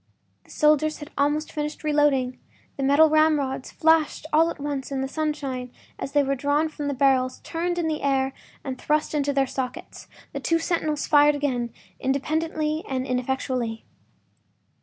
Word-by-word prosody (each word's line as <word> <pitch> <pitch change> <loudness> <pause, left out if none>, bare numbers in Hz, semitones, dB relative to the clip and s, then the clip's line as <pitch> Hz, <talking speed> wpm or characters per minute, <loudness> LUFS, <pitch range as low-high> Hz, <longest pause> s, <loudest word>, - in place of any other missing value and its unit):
The - - -24
soldiers 305 0 +2
had 295 - -10
almost 295 +2 0
finished 300 0 -4
reloading; 290 -4 +2 0.4
the - - -5
metal 285 +4 +5
ramrods 300 -4 +2
flashed 320 -1 +2
all 325 +2 +5
at - - -6
once 285 -1 -4
in 270 -1 -1
the 265 - -1
sunshine 275 -4 -3 0.3
as 275 - -5
they 290 -1 +4
were 275 0 0
drawn 285 +4 +1
from 295 -1 -5
the 285 - -1
barrels, 260 -1 +2
turned 350 +1 -2
in 340 -2 0
the 310 -1 -2
air, 270 -1 +1 0.3
and 260 -2 -5
thrust 300 +1 0
into 285 -1 +1
their 275 -1 +2
sockets. 255 -1 -6 0.3
The - - -3
two 330 - +1
sentinels 325 -3 -1
fired 295 0 +5
again, 250 -5 -1 0.3
independently 310 +3 -1
and 260 -1 -1
ineffectually. 250 -2 -2
290 Hz, 160 wpm, -25 LUFS, 265-310 Hz, 0.4 s, metal